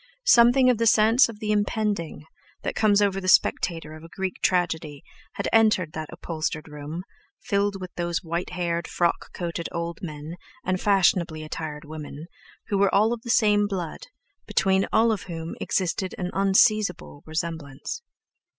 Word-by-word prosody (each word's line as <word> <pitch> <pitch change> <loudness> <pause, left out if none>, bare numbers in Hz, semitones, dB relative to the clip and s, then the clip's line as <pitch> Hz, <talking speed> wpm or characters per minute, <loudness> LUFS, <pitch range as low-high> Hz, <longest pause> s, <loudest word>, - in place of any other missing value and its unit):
Something 245 +2 +6
of 235 - -1
the 230 - +2
sense 225 +4 +5
of 215 -2 -9
the 215 -1 -2
impending, 205 -6 -1 0.4
that - - -2
comes 205 -1 +3
over 195 -1 0
the 185 - -5
spectator 165 -4 +2
of 155 0 -11
a 165 - -11
Greek 190 +1 -4
tragedy, 160 -5 0 0.3
had - - -3
entered 210 -8 +3
that 155 -1 -5
upholstered 155 -2 -4
room, 150 +3 -7 0.4
filled 200 0 0
with 185 -1 -8
those 175 +1 -2
white 170 +1 -3
haired, 170 -2 -2
frock 170 -1 -1
coated 170 -1 -4
old 170 0 -4
men, 155 0 -7 0.3
and 185 0 0
fashionably 175 -5 +2
attired 155 0 -6
women, 150 0 -8 0.4
who 200 - +1
were 200 0 +4
all 215 +4 +3
of 235 - -6
the 235 - -9
same 210 -3 +4
blood, 195 - -5 0.4
between 190 0 +2
all 225 +1 +4
of 210 -4 -3
whom 165 -1 -5
existed 185 0 -1
an 180 -1 -3
unseizable 195 - +2
resemblance. 160 - -4
180 Hz, 160 wpm, -25 LUFS, 160-205 Hz, 0.4 s, Something